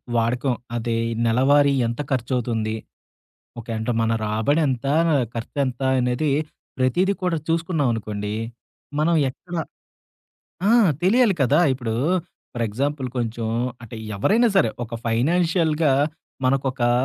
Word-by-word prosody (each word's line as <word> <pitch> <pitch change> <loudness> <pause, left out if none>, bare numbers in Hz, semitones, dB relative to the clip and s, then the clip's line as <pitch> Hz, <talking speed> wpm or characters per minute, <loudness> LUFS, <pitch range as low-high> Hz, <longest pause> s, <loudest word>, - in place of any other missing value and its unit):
వాడకం 120 +3 +1 0.2
అదే 115 0 -1 0.3
నెలవారీ 140 +5 +4
ఎంత 120 +4 -3
ఖర్చువుతుంది? 120 -3 -1 0.8
ఓకే. 115 0 -8
అంటే 110 +2 -1
మన 115 - +1
రాబడెంత? 130 +5 +1 0.5
ఖర్చెంత? 125 +2 -3 0.2
అనేది 125 +4 0 0.5
ప్రతీదీ 175 +10 +2
కూడా 180 -2 +1
చూసుకున్నామనుకోండి. 120 - -1 0.7
మనం 165 +2 +3 0.2
ఎక్కడ 175 +7 -11 1.1
ఆ! - - +4 0.3
తెలియాలి 215 +3 +4
కదా! 140 +4 +3
ఇప్పుడు 120 -4 -3 0.6
ఫర్ 120 -1 -1
ఎగ్జాంపుల్. 135 +4 -2
కొంచెం 115 -1 -2 0.4
అంటే 115 0 -9 0.2
ఎవరైనా 225 - +3
సరే 115 - +5 0.2
ఒక 120 0 -8
ఫైనాన్షియల్‌గా 160 +4 +2 0.5
మనకొకా 130 -2 +1
130 Hz, 100 wpm, -23 LUFS, 115-155 Hz, 1.1 s, సరే